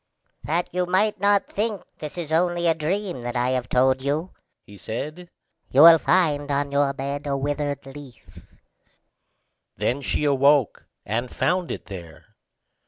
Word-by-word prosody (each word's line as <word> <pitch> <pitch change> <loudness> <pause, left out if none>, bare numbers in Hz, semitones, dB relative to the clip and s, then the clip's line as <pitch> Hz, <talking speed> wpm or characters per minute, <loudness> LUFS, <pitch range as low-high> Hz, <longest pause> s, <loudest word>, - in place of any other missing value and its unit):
"That 170 +3 -2
you 180 0 0
may 200 +4 +2
not 200 0 +3
think 210 -1 -3 0.2
this 150 +2 -7
is 165 -3 -4
only 175 +1 +1
a 165 - +4
dream 175 -1 -3
that 120 0 -5
I 125 +1 +1
have 130 -1 -2
told 130 +1 +2
you," 150 +6 -2 0.3
he 105 - -14
said, 155 +10 -6 0.4
"you 140 +4 +6
will 165 -1 +9
find 150 -6 +1
on 140 0 -1
your 140 0 +2
bed 140 +2 -5
a 140 -1 0
withered 145 0 -3
leaf." 135 -2 -13 1.4
Then 130 +4 -1
she 145 - -1
awoke, 140 -2 +2 0.2
and 120 +4 -2
found 180 +6 -1
it - - -6
there. 85 -6 -11
145 Hz, 155 wpm, -23 LUFS, 135-175 Hz, 1.4 s, will